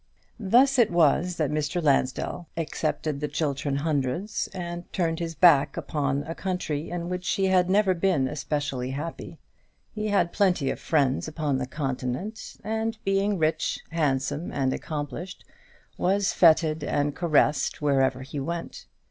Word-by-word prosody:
Thus 250 +6 +4
it 235 - +5
was 175 +1 +3
that 150 -3 0
Mr. 150 +2 -1
Lansdell 145 +2 0
accepted 155 -2 -2
the 150 - -2
Chiltern 140 -2 -1
Hundreds, 150 +6 -1
and 175 -1 -6
turned 165 -3 -1
his 165 -1 -4
back 150 -5 +5
upon 145 -2 -1
a 160 +3 -5
country 170 -5 -3
in 175 -1 -4
which 180 +1 -3
he 195 - +1
had 185 -1 +3
never 195 0 +4
been 170 -7 +1
especially 145 -3 -3
happy. 165 +1 -6 0.6
He 215 -1 -3
had 200 -4 +1
plenty 180 -9 +2
of - - -6
friends 140 -4 +1
upon 150 -3 -1
the 125 - -3
Continent; 135 - -4
and 220 +1 -2
being 195 +1 +1
rich, 155 -1 0
handsome, 145 0 -1
and 130 -2 0
accomplished, 155 +4 -5 0.5
was 195 +2 +2
fêted 160 -2 +4
and 145 0 0
caressed 150 -4 +2
wherever 135 -3 +1
he 140 +2 -6
went. 170 +5 -5
160 Hz, 145 wpm, -26 LUFS, 145-180 Hz, 0.6 s, it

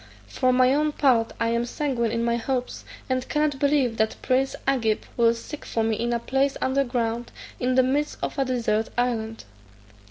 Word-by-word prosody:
For 255 - +1
my 255 +1 +4
own 300 +1 +1
part 245 -6 +3
I 230 - +1
am 235 0 +1
sanguine 245 -2 -1
in 230 0 -1
my 235 0 +1
hopes, 250 +1 -3 0.2
and 255 -1 -2
cannot 300 -2 0
believe 280 -5 +2
that 220 0 +1
prince 265 +1 +1
Agib 230 -6 +1
will 235 -1 +4
seek 285 +6 -8
for 225 - -1
me 220 0 +1
in 235 +2 -1
a 235 - +2
place 270 +3 0
under 270 +1 +1
ground, 240 -2 -2 0.3
in 255 0 +1
the 260 - +5
midst 285 +4 0
of - - -3
a 270 - +2
desert 230 -4 0
island." 225 -2 -1
250 Hz, 190 wpm, -25 LUFS, 230-270 Hz, 0.3 s, the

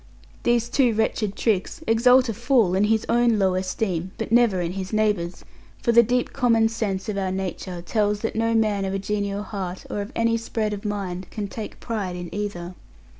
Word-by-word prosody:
These 240 -1 +2
two 245 -2 +2
wretched 215 -2 0
tricks 225 - -1
exalt 250 +3 +5
a 225 - -1
fool 225 -4 +2
in 195 +2 +3
his 220 +1 +1
own 235 -1 +3
low 190 -2 +2
esteem, 185 -1 -2
but 225 -1 -4
never 230 -5 +4
in 170 -1 -1
his 190 0 -5
neighbour's; 205 -6 0 0.4
for 235 - +3
the 235 0 +8
deep 245 +2 0
common 230 -4 +3
sense 205 -5 -3
of 205 -2 -2
our 190 -1 -1
nature 185 -2 -4
tells 210 +2 0
that 225 - -2
no 230 +1 +1
man 210 -3 +2
of 190 0 -2
a - - +1
genial 200 0 -2
heart, 190 -3 -5
or 205 - -2
of 200 +4 -6
any 230 0 +2
spread 220 -2 -2
of 205 +1 -7
mind, 190 -3 -3
can 210 -2 -4
take 215 +2 -7
pride 200 -6 -3
in 175 -1 -7
either. 195 -4 -4
210 Hz, 200 wpm, -24 LUFS, 190-230 Hz, 0.4 s, the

